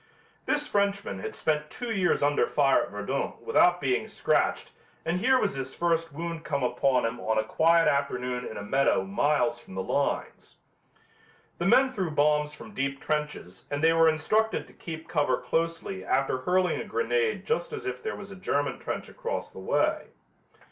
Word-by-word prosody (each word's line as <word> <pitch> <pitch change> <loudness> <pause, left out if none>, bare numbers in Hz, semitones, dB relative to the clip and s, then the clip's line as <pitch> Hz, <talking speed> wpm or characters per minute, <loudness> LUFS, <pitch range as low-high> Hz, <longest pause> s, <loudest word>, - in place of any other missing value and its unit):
This 295 0 +1
Frenchman 200 - 0
had - - -6
spent 150 -1 -1
two 245 -2 -5
years 185 -7 +2
under 145 0 +3
fire 140 -2 +3
at - - -4
Verdun 105 +7 -3
without 175 0 +3
being 135 -4 0
scratched - - 0 0.3
and 170 +2 0
here 260 +6 +4
was 210 - 0
his 135 -1 -5
first 165 -1 0
wound 165 +2 -5
come 140 -3 -2
upon 125 0 +2
him 115 +2 -3
on 110 0 0
a 110 - +3
quiet 165 +8 +3
afternoon 125 -3 0
in 110 - -6
a 105 - -5
meadow 135 +6 +2
miles 145 -11 +1
from 95 - -13
the 95 - -2
lines. - - -2 1.0
The 170 - 0
men 260 +6 +5
threw 190 -9 -2
bombs 150 0 +2
from 210 +8 -12
deep 140 -5 -2
trenches 150 - -3
and 145 +1 -3
they 165 0 +6
were 165 0 +5
instructed 215 +8 +1
to - - -18
keep 160 -1 -8
cover 145 - +1
closely 165 - -2
after 135 +3 +1
hurling 180 +6 +1
a - - -4
grenade 460 0 0
just 465 0 -1
as 440 -3 -6
if 385 - -4
there 440 0 -3
was 200 -1 -9
a - - -8
German 145 -6 -1
trench - - -4
across - - -5
the - - -10
way. - - 0
155 Hz, 180 wpm, -27 LUFS, 135-190 Hz, 1.0 s, they